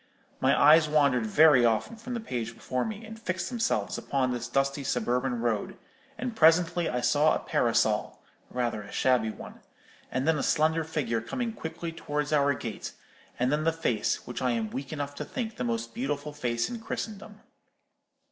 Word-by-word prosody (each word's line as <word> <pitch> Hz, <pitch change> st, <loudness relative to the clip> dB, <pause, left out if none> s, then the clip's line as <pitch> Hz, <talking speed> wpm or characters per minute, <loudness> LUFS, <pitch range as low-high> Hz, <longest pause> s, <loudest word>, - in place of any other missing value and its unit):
My -, -, +3 dB
eyes 155 Hz, +1 st, +7 dB
wandered 140 Hz, -7 st, +3 dB
very 150 Hz, +1 st, +6 dB
often 115 Hz, -, +1 dB
from 245 Hz, +3 st, -6 dB
the -, -, -2 dB
page 120 Hz, -, -4 dB
before 130 Hz, +1 st, -2 dB
me, 220 Hz, 0 st, -5 dB
and 220 Hz, +1 st, -10 dB
fixed 185 Hz, -4 st, -2 dB
themselves 235 Hz, -2 st, -1 dB
upon 130 Hz, -2 st, 0 dB
this 120 Hz, -1 st, -3 dB
dusty 135 Hz, +3 st, 0 dB
suburban 125 Hz, 0 st, 0 dB
road; 115 Hz, -4 st, -1 dB, 0.4 s
and 240 Hz, 0 st, -4 dB
presently 165 Hz, -1 st, +4 dB
I 125 Hz, 0 st, -1 dB
saw 150 Hz, +5 st, +3 dB
a -, -, -1 dB
parasol, 110 Hz, -3 st, +1 dB, 0.3 s
rather 120 Hz, -3 st, -2 dB
a 100 Hz, -, -11 dB
shabby 125 Hz, -4 st, +2 dB
one, -, -, -9 dB, 0.5 s
and 130 Hz, +3 st, -1 dB
then 160 Hz, -2 st, +3 dB
a -, -, 0 dB
slender 160 Hz, +1 st, +2 dB
figure 140 Hz, -8 st, -2 dB
coming 235 Hz, -, -3 dB
quickly 165 Hz, -3 st, -5 dB
towards 150 Hz, -2 st, -3 dB
our 140 Hz, -1 st, +3 dB
gate, 115 Hz, -4 st, -6 dB, 0.4 s
and 125 Hz, +1 st, +1 dB
then 150 Hz, +1 st, +1 dB
the 165 Hz, -, +3 dB
face, 125 Hz, -10 st, -1 dB
which 125 Hz, -, -6 dB
I 125 Hz, -1 st, +1 dB
am 110 Hz, -2 st, -2 dB
weak 135 Hz, +1 st, -5 dB
enough 145 Hz, -2 st, -4 dB
to -, -, -5 dB
think 230 Hz, -4 st, -5 dB
the -, -, -2 dB
most 115 Hz, -1 st, -2 dB
beautiful 145 Hz, +4 st, -3 dB
face 120 Hz, -5 st, -1 dB
in 240 Hz, -, -6 dB
Christendom. 210 Hz, -2 st, -6 dB
140 Hz, 180 wpm, -28 LUFS, 120-165 Hz, 0.5 s, eyes